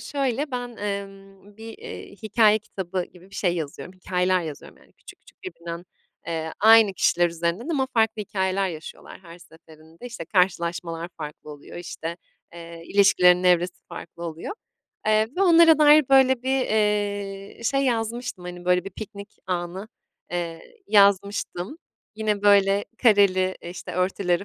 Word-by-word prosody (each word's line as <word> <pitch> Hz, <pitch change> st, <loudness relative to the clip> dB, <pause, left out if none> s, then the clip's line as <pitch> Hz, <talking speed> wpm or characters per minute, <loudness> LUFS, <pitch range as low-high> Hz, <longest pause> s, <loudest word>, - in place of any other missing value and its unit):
şöyle, 275 Hz, +3 st, -2 dB
ben, 245 Hz, -2 st, -5 dB
emm, 200 Hz, 0 st, -7 dB
bir, 225 Hz, 0 st, -10 dB
iii, -, -, -10 dB
hikâye 215 Hz, 0 st, +4 dB
kitabı 190 Hz, -3 st, -5 dB
gibi 180 Hz, +2 st, -19 dB
bir -, -, -15 dB
şey 175 Hz, -3 st, 0 dB
yazıyorum, 165 Hz, +2 st, -6 dB
hikâyeler 185 Hz, 0 st, 0 dB
yazıyorum, 155 Hz, -3 st, -9 dB
yani, -, -, -24 dB
küçük, -, -, -16 dB
küçük -, -, -23 dB
birbirinden, 170 Hz, -, -8 dB, 0.4 s
eee, 160 Hz, -1 st, -3 dB
aynı 220 Hz, -2 st, +7 dB
kişiler 175 Hz, -2 st, +2 dB
üzerinden 170 Hz, -, -3 dB
ama 280 Hz, -5 st, 0 dB
farklı 220 Hz, -1 st, +1 dB
hikâyeler 190 Hz, -1 st, -1 dB
yaşıyorlar 160 Hz, -3 st, -9 dB
her 170 Hz, -1 st, -13 dB
seferinde. 160 Hz, +3 st, -15 dB
İşte, 235 Hz, -9 st, -7 dB
karşılaşmalar 170 Hz, -2 st, -1 dB
farklı 150 Hz, 0 st, -8 dB
oluyor, 145 Hz, -1 st, -11 dB
işte, 170 Hz, -1 st, -6 dB, 0.4 s
eee, 170 Hz, -1 st, -10 dB
ilişkilerin 180 Hz, -3 st, +4 dB
evresi 180 Hz, 0 st, +2 dB
farklı 170 Hz, 0 st, -9 dB
oluyor, 165 Hz, -, -6 dB, 0.5 s
eee, 215 Hz, 0 st, +3 dB
ve 390 Hz, -, +2 dB
onlara 335 Hz, -3 st, +6 dB
dair, 300 Hz, -2 st, +6 dB
böyle, 265 Hz, -2 st, +4 dB
bir, 265 Hz, +1 st, +1 dB
eee, 205 Hz, -2 st, -1 dB
şey, 275 Hz, +4 st, +1 dB
yazmıştım. 235 Hz, -4 st, -2 dB
Hani, 175 Hz, 0 st, -8 dB
böyle, 180 Hz, 0 st, +2 dB
bir 195 Hz, -, -7 dB
piknik 200 Hz, +1 st, -10 dB
anı, 180 Hz, +2 st, -4 dB, 0.4 s
eee, 170 Hz, -, -5 dB
yazmıştım. 200 Hz, -, +2 dB, 0.4 s
Yine, 210 Hz, -2 st, -2 dB
böyle, 200 Hz, 0 st, +4 dB, 0.2 s
kareli, 195 Hz, -5 st, +4 dB
işte, 175 Hz, +1 st, -8 dB
örtüleri 180 Hz, 0 st, 0 dB
195 Hz, 140 wpm, -24 LUFS, 175-220 Hz, 0.5 s, aynı